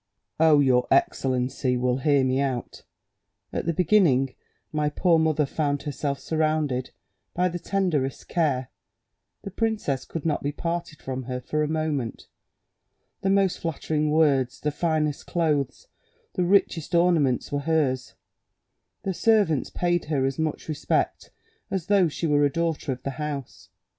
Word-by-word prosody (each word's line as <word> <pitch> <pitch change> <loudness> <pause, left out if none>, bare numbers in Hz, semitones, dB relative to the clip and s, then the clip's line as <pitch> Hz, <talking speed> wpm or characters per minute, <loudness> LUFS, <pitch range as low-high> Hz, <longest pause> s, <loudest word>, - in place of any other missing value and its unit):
"Oh, 155 -2 +6
your 125 -3 +3
excellency 130 -1 +1
will 125 0 +1
hear 140 0 +3
me 130 +1 +1
out. 130 -3 -3 0.7
At - - -3
the - - +3
beginning, 155 -7 +3 0.4
my 150 -1 0
poor 165 +2 +3
mother 155 -2 +2
found 145 0 -1
herself 145 -1 -2
surrounded 155 -5 0 0.5
by 180 +1 +2
the 175 0 -5
tenderest 170 -8 -1
care: 140 -7 0 0.7
the 200 - -6
princess 210 - -1
could 165 -2 -6
not 155 -2 0
be 145 - -1
parted 170 0 -4
from 130 -1 -4
her 125 0 -3
for 150 +4 -2
a 150 - +1
moment; 155 -6 -2 1.0
the 190 - 0
most 195 -1 +2
flattering 155 -1 -1
words, 140 -5 +2
the 150 - -1
finest 155 -1 -1
clothes, 160 - -1 0.5
the 180 - 0
richest 175 -3 +2
ornaments 165 -7 +2
were 145 - 0
hers; 140 -4 0 0.9
the 190 - -1
servants 200 - +2
paid 175 -1 0
her 145 -4 0
as 135 +1 -2
much 160 -1 -2
respect 155 -2 -1 0.4
as 190 -4 -2
though 200 -4 +4
she 160 +2 -4
were 145 -2 +3
a 145 - +3
daughter 165 -3 -1
of 125 -1 -5
the 140 - -2
house. 145 -4 -5
150 Hz, 150 wpm, -25 LUFS, 135-170 Hz, 1.0 s, Oh